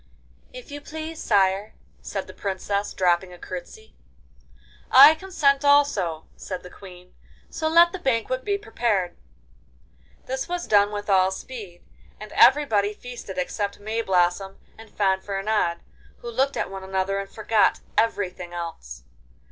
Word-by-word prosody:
'If -, -, -11 dB
you 290 Hz, 0 st, -7 dB
please, 315 Hz, +2 st, -7 dB
sire,' 195 Hz, 0 st, +1 dB, 0.3 s
said -, -, -5 dB
the -, -, -12 dB
Princess, 200 Hz, +1 st, -3 dB
dropping 180 Hz, 0 st, +1 dB
a 180 Hz, -, -11 dB
curtsey. 185 Hz, -, -9 dB, 1.0 s
'I 280 Hz, +4 st, +9 dB
consent 310 Hz, -5 st, +1 dB
also,' 280 Hz, -, +2 dB
said 185 Hz, -2 st, -7 dB
the 180 Hz, -, -11 dB
Queen; 180 Hz, -2 st, -14 dB, 0.4 s
'so 315 Hz, -, -2 dB
let 340 Hz, +2 st, +6 dB
the 380 Hz, -, -6 dB
banquet 255 Hz, -3 st, -1 dB
be 405 Hz, -1 st, 0 dB
prepared.' 215 Hz, -, -1 dB, 1.1 s
This 265 Hz, +4 st, -4 dB
was 350 Hz, 0 st, -3 dB
done 205 Hz, -1 st, +4 dB
with 205 Hz, 0 st, -5 dB
all 190 Hz, -2 st, +4 dB
speed, 190 Hz, -3 st, -9 dB, 0.4 s
and 215 Hz, 0 st, -10 dB
everybody 220 Hz, -7 st, +4 dB
feasted 245 Hz, -6 st, -9 dB
except 200 Hz, +2 st, -3 dB
Mayblossom 195 Hz, -3 st, 0 dB, 0.2 s
and 225 Hz, 0 st, -14 dB
Fanfaronade, 195 Hz, -2 st, 0 dB, 0.4 s
who 240 Hz, -, -5 dB
looked 270 Hz, +4 st, 0 dB
at -, -, -2 dB
one 195 Hz, -1 st, -7 dB
another 190 Hz, +1 st, -1 dB
and 195 Hz, 0 st, -6 dB
forgot 215 Hz, -1 st, +1 dB
everything 185 Hz, -5 st, -1 dB
else. 60 Hz, -, -7 dB
205 Hz, 135 wpm, -24 LUFS, 190-265 Hz, 1.1 s, I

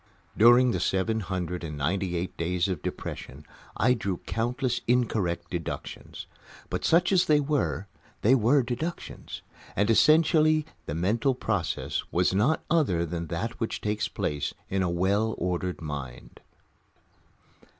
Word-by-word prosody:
During 120 Hz, +3 st, +6 dB
the -, -, -1 dB
seven 110 Hz, +4 st, 0 dB
hundred 90 Hz, -2 st, -3 dB
and 75 Hz, -3 st, -5 dB
ninety 90 Hz, +5 st, -1 dB
eight 85 Hz, +2 st, -3 dB
days 85 Hz, +2 st, 0 dB
of 90 Hz, -6 st, -3 dB
depression 70 Hz, +3 st, -6 dB, 0.3 s
I 125 Hz, +5 st, +4 dB
drew 100 Hz, -6 st, -2 dB
countless 125 Hz, +2 st, -1 dB
incorrect 105 Hz, -8 st, 0 dB
deductions. 85 Hz, -3 st, -6 dB, 0.5 s
But, -, -, -2 dB
such 175 Hz, +3 st, +3 dB
as 185 Hz, -2 st, +4 dB
they 150 Hz, -1 st, +4 dB
were, 100 Hz, -, -1 dB, 0.4 s
they 115 Hz, -, +5 dB
were 130 Hz, +3 st, +4 dB
deductions, 130 Hz, +8 st, -5 dB, 0.3 s
and 105 Hz, +4 st, +2 dB
essentially 155 Hz, +3 st, +4 dB, 0.2 s
the 75 Hz, -, -3 dB
mental 115 Hz, -, +1 dB
process 100 Hz, -8 st, -2 dB
was 90 Hz, +2 st, +2 dB
not 120 Hz, +11 st, +2 dB
other 130 Hz, -, +2 dB
than 85 Hz, 0 st, -4 dB
that 90 Hz, +8 st, -4 dB
which 115 Hz, -, -2 dB
takes 105 Hz, 0 st, -1 dB
place 75 Hz, -1 st, -3 dB, 0.2 s
in 95 Hz, 0 st, +1 dB
a 90 Hz, -, +1 dB
well 100 Hz, +6 st, +1 dB
ordered 90 Hz, 0 st, -2 dB
mind. 70 Hz, -5 st, -7 dB
100 Hz, 140 wpm, -27 LUFS, 85-125 Hz, 0.5 s, During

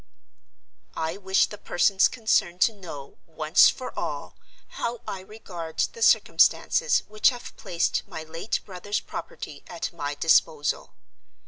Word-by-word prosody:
"I 160 Hz, +3 st, -2 dB
wish 190 Hz, -1 st, +3 dB
the 210 Hz, -, -10 dB
persons 190 Hz, +2 st, +3 dB
concerned 215 Hz, -6 st, 0 dB
to 225 Hz, -, +5 dB
know, 165 Hz, -9 st, -10 dB
once 155 Hz, -1 st, +5 dB
for 255 Hz, -, -5 dB
all, -, -, -4 dB, 0.3 s
how 240 Hz, -, -4 dB
I 195 Hz, -, -4 dB
regard 185 Hz, -5 st, -9 dB, 0.2 s
the 465 Hz, -, -11 dB
circumstances 485 Hz, +1 st, +4 dB
which 215 Hz, 0 st, +4 dB
have 245 Hz, -2 st, -8 dB
placed 170 Hz, -1 st, -1 dB
my 160 Hz, -, -7 dB
late 165 Hz, +7 st, -3 dB
brother's 205 Hz, +2 st, -3 dB
property -, -, -8 dB
at -, -, -5 dB
my 145 Hz, -3 st, -4 dB
disposal. 150 Hz, -1 st, +2 dB
185 Hz, 130 wpm, -26 LUFS, 160-215 Hz, 0.3 s, to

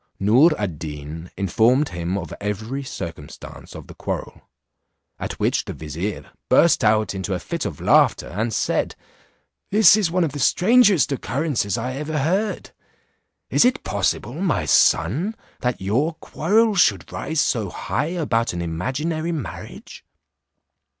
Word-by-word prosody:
Noor 125 Hz, -, +5 dB
ad 90 Hz, -8 st, -4 dB
Deen 75 Hz, +2 st, -7 dB
informed 120 Hz, -, +2 dB
him 85 Hz, +2 st, -3 dB
of 90 Hz, -, -6 dB
every 110 Hz, +6 st, -3 dB
circumstance 85 Hz, -, -9 dB
of -, -, -9 dB
the -, -, -12 dB
quarrel; -, -, -6 dB, 0.7 s
at -, -, -4 dB
which -, -, +1 dB
the -, -, -5 dB
vizier, 80 Hz, +7 st, -5 dB, 0.2 s
burst 170 Hz, -, +4 dB
out 110 Hz, -1 st, +2 dB
into 95 Hz, 0 st, -3 dB
a -, -, -3 dB
fit -, -, -4 dB
of -, -, -7 dB
laughter, -, -, +3 dB
and 110 Hz, +5 st, -2 dB
said, -, -, -1 dB, 0.7 s
"This 210 Hz, -1 st, +7 dB
is 210 Hz, -5 st, +1 dB
one 180 Hz, +1 st, +1 dB
of 160 Hz, -, -1 dB
the 145 Hz, -, -6 dB
strangest 200 Hz, -, +4 dB
occurrences 135 Hz, -, -1 dB
I 125 Hz, +3 st, -3 dB
ever 150 Hz, +2 st, -3 dB
heard. 190 Hz, +9 st, -1 dB, 0.8 s
Is -, -, +5 dB
it 250 Hz, +1 st, +2 dB
possible, 100 Hz, +4 st, -1 dB
my 180 Hz, +4 st, -1 dB
son, 155 Hz, -, +2 dB, 0.2 s
that 125 Hz, -1 st, -2 dB
your 130 Hz, -, 0 dB
quarrel 210 Hz, +8 st, +1 dB
should 190 Hz, -, +2 dB
rise 160 Hz, -1 st, -3 dB
so 115 Hz, -8 st, +1 dB
high 150 Hz, -, -2 dB
about 150 Hz, -, -1 dB
an 85 Hz, -, -3 dB
imaginary 150 Hz, -, -2 dB
marriage? 155 Hz, -7 st, -7 dB
125 Hz, 145 wpm, -22 LUFS, -, 0.8 s, This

